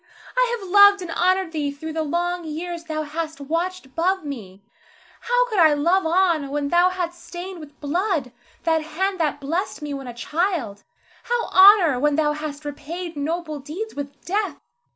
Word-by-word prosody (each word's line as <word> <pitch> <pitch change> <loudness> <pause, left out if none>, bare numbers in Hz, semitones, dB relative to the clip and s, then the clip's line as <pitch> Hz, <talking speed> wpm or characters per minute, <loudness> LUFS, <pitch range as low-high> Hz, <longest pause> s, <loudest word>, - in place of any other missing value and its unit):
I - - +2
have 395 -4 -9
loved 405 0 +7
and 340 - -6
honored 370 +1 +1
thee 300 -3 -1
through 310 +3 -6
the 320 - -1
long 345 +3 -1
years 335 +2 -5
thou 310 -1 -3
hast 315 +1 -5
watched 335 +4 -2
above 340 +6 -1
me. 205 -9 -8 0.6
How - - +2
could 430 -5 -1
I 315 -3 +6
love 340 +5 +2
on 335 -4 +2
when 285 0 -2
thou 350 +2 +4
hadst 350 -1 -4
stained 360 +1 -7
with 300 -1 -13
blood 315 - -1 0.3
that 320 -1 +2
hand 370 +5 -2
that 300 -3 0
blessed 325 +4 -3
me 295 -1 -4
when 270 -2 -6
a 245 - -6
child, 300 - -2 0.4
how 480 -1 0
honor 375 -8 +7
when 295 +1 +2
thou 300 -1 +2
hadst 300 -1 -6
repaid 325 +4 -6
noble 310 +1 -3
deeds 340 +11 -6
with 285 -1 -7
death? 405 +3 -1
330 Hz, 175 wpm, -23 LUFS, 295-370 Hz, 0.6 s, loved